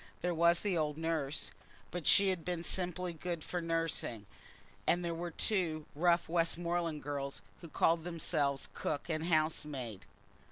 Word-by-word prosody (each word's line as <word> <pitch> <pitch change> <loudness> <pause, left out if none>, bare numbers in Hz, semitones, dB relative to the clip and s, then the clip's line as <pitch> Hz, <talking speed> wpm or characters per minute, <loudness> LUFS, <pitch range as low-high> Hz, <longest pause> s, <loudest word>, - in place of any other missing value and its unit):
There 175 0 0
was 170 +1 +4
the 200 -3 0
old 150 -2 0
nurse, 160 -3 -2 0.4
but 175 -3 -3
she 200 -1 +7
had 180 -3 -1
been 175 -1 -2
simply 180 -1 -1
good 170 0 -4
for 175 - -3
nursing, 165 -10 -1 0.6
and 175 0 +3
there 170 - -1
were 170 +1 -3
two 165 -4 0
rough 170 +3 +3
Westmoreland 170 -1 0
girls 140 -1 -4 0.2
who 170 - -8
called 165 +1 +3
themselves 155 -5 0
cook 145 +3 -3
and 160 0 -1
housemaid. 150 - 0
165 Hz, 150 wpm, -34 LUFS, 155-175 Hz, 0.6 s, she